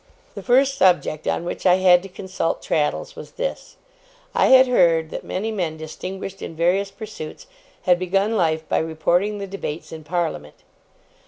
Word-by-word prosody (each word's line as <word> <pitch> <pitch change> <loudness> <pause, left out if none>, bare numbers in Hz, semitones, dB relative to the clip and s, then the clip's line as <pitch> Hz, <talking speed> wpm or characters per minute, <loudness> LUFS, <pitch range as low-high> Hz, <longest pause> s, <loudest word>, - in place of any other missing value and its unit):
The - - -7
first 270 +2 +3
subject 175 -4 +2
on 170 - -1
which - - -5
I 180 - +6
had 185 -1 +5
to 195 - -10
consult 185 -2 -3
Traddles 150 -1 -1
was - - -10
this, - - -5 0.6
I - - +3
had 260 0 +8
heard 165 -9 +3
that - - -5
many 215 +4 -3
men 175 -7 -2
distinguished 185 +5 -7
in 165 - -7
various 180 +5 +1
pursuits 200 - -9 0.4
had 180 -2 +3
begun 195 +4 0
life 160 -4 0
by - - +1
reporting 175 +6 0
the 200 - -5
debates 185 -5 -6
in 160 -1 -8
Parliament. 160 - -3
180 Hz, 165 wpm, -22 LUFS, 160-200 Hz, 0.6 s, had